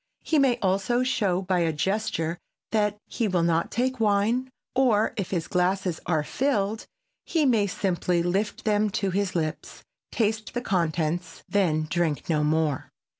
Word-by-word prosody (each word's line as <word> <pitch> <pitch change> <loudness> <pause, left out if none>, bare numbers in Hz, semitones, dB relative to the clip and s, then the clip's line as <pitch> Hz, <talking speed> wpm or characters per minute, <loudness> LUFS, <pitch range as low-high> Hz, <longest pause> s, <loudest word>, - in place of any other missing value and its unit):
He 315 - +2
may 260 -3 +3
also 195 +6 +2
show 195 -7 +1
by 185 -1 +1
a 165 -1 +2
gesture 170 0 -1 0.3
that 210 -1 +1
he 230 - -1
will 180 -3 +1
not 170 0 +1
take 255 +1 -1
wine, 220 +4 +2 0.2
or, 240 -5 +3
if 200 -4 -3
his 170 -4 -2
glasses 180 -1 0
are 160 -3 +1
filled, 220 - -1 0.4
he 320 -3 +1
may 225 -6 +3
simply 180 -2 0
lift 195 +5 -1
them 210 0 +2
to 195 -3 0
his 195 0 -1
lips, 155 -2 -3 0.3
taste 220 0 -1
the 245 - 0
contents, 170 -4 -1
then 160 -6 +1
drink 165 -3 -1
no 150 -1 +2
more. 150 -2 0
195 Hz, 155 wpm, -26 LUFS, 170-220 Hz, 0.4 s, may